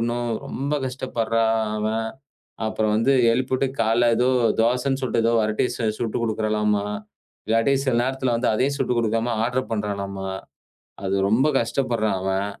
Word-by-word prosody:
ணும். 120 0 -2 0.2
ரொம்ப 140 +3 -2
கஷ்டப்படுறான் 115 -3 0 0.2
அவன். 110 +1 -1 0.6
அப்புறம் 110 -1 0
வந்து 115 +5 +3 0.2
எழுப்பிட்டு 130 +2 0
காலையில 115 +2 +3
ஏதோ 125 - +2 0.3
தோசைன்னு 125 +3 +1
சொல்லிட்டு 125 -3 0
ஏதோ 115 - +4
வரட்டிய 110 +3 +1
சு 115 - -3
சுட்டு 115 -2 -2
குடுக்கிறளாம்மா! 105 -2 0 0.6
இல்லாட்டி 115 +5 +2
சில 130 -3 +1
நேரத்துல 130 -1 0
வந்து 120 +1 0
அதையும் 130 +6 +1
சுட்டு 125 - 0
குடுக்காம, 115 +1 0
ஆடர் 125 +2 -1
பண்றாளாம்மா. 100 -3 -3 0.8
அது 95 - 0
ரொம்ப 115 +7 +3
கஷ்டப்படுறான் 115 -4 0
அவன். 95 +1 -1
115 Hz, 140 wpm, -23 LUFS, 110-125 Hz, 0.8 s, ஏதோ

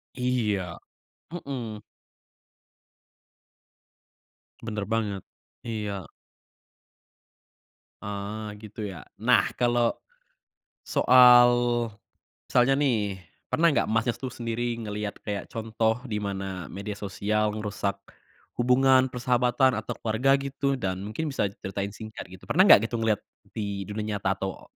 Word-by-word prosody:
Iya. 105 -9 -1 0.5
Mhm. 125 -10 -5 2.8
Bener 105 -2 -3
banget. 105 -4 -1 0.5
Iya. 105 -3 -3 2.1
Ah, 105 +1 -5
gitu 105 +1 -12
ya? 90 -5 -8 0.2
Nah, - - +4 0.2
kalau, 120 -1 +3 1.0
soal 125 -1 +7 1.0
misalnya 125 +2 +4
nih, 105 -8 0 0.3
pernah 170 +1 +5
nggak 145 - +2
Masnya 115 +2 +1
tuh 130 -3 -6
sendiri 120 0 -2
ngeliat 105 -1 -4
kayak 100 -1 -4
contoh 110 +1 0
di 105 - -1
mana 95 -3 -4
media 100 +2 -6
sosial 105 +1 -1
ngerusak 100 -2 -3 0.6
hubungan, 130 +1 +5
persahabatan, 125 0 +2
atau 110 - -4
keluarga, 115 +5 +2
gitu? 140 0 -1
Dan 95 -7 -3
mungkin 115 +10 -3
bisa 135 - 0
diceritain 100 0 -4
singkat, 110 0 -8
gitu. 95 - -14
Pernah 185 +4 +5
nggak 115 - +7
gitu 120 - -2
ngeliat 110 -2 +1 0.3
di 100 -2 -3
dunia 105 +1 -3
nyata 95 0 0
atau 95 -1 -6
110 Hz, 110 wpm, -27 LUFS, 100-125 Hz, 2.8 s, soal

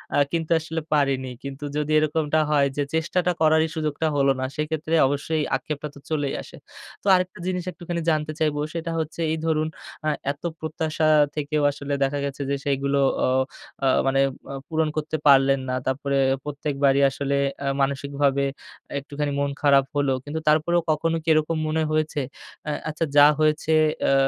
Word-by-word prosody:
আ - - +3
কিন্তু 165 -1 -2
আসলে 160 0 -4
পারিনি। 135 -3 +1
কিন্তু 140 +1 -7
যদি 150 0 -1
এরকমটা 155 0 +1
হয় 140 -2 +3
যে 145 - +2
চেষ্টাটা 180 +3 +1
করারই 160 +1 +4
সুযোগটা 155 0 -1
হল 140 -1 +3
না 130 - -1
সেক্ষেত্রে 155 +1 -3
অবশ্যই 145 +3 -1
আক্ষেপটা 150 0 -4
তো - - -11
চলেই 145 -3 -1
আসে। - - -12 0.5
তো - - -5
আরেকটা 180 +1 -2
জিনিস 180 -1 -1
একটুখানি 175 -1 -5
জানতে 155 0 0
চাইব, 155 -2 +1 0.2
সেটা 165 0 -3
হচ্ছে 160 +1 -4
এই 160 - 0
ধরুন 155 -1 +1 0.4
আ - - +4 0.2
এত 145 - -12 0.2
প্রত্যাশা 155 0 -2 0.3
থেকেও 150 0 -1
আসলে 140 0 -5
দেখা 140 +1 0
গেছে 140 0 -5
যে 140 - +1
সেইগুলো 140 0 0 0.3
অ - - +2 0.6
আ - - +4 0.2
মানে 135 0 +2 0.3
আ - - -5
পূরণ 160 -1 0
করতে 155 +1 -2
পারলেন 135 0 +6
না। - - -1
তারপরে 140 +1 -1 0.3
প্রত্যেকবারই 140 -1 +1
আসলে 140 +1 -2 0.2
অ্যা 140 - -3
মানসিকভাবে 140 0 0 0.6
একটুখানি 145 +1 -4
মন 140 0 0
খারাপ 140 -2 +5
হলো। 140 -2 +2
কিন্তু 150 +2 -4
তারপরেও 160 +3 +3
কখনো 165 +2 0
কি - - -31
এরকম 155 +1 +1
মনে 155 +1 0
হয়েছে 155 -1 0 0.5
অ্যা 150 - -2 0.2
আচ্ছা 155 +2 -1
যা 145 - +9
হয়েছে 155 +1 +1 0.3
অ্যা 135 - +3
150 Hz, 170 wpm, -24 LUFS, 140-160 Hz, 0.6 s, যা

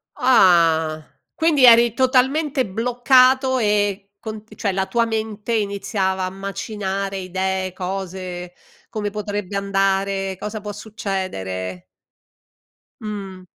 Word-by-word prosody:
Ah, 165 - +4 0.3
quindi 320 -4 +2
eri 235 -1 +7
totalmente 260 +2 +2
bloccato 255 +4 +3
e 205 -2 0
con 215 -2 -7
cioè 200 -4 -1
la 190 0 0
tua 230 +5 +1
mente 220 0 -3
iniziava 200 -2 -1
a - - -2
macinare 195 0 -4
idee, 190 0 -2
cose: 185 -1 -5 0.4
come 210 -1 -3
potrebbe 205 -1 -4
andare, 195 -1 0
cosa 210 +3 -5
può 205 0 -6
succedere? 185 - -5 1.2
Mh. 200 -3 -6
200 Hz, 100 wpm, -21 LUFS, 190-225 Hz, 1.2 s, eri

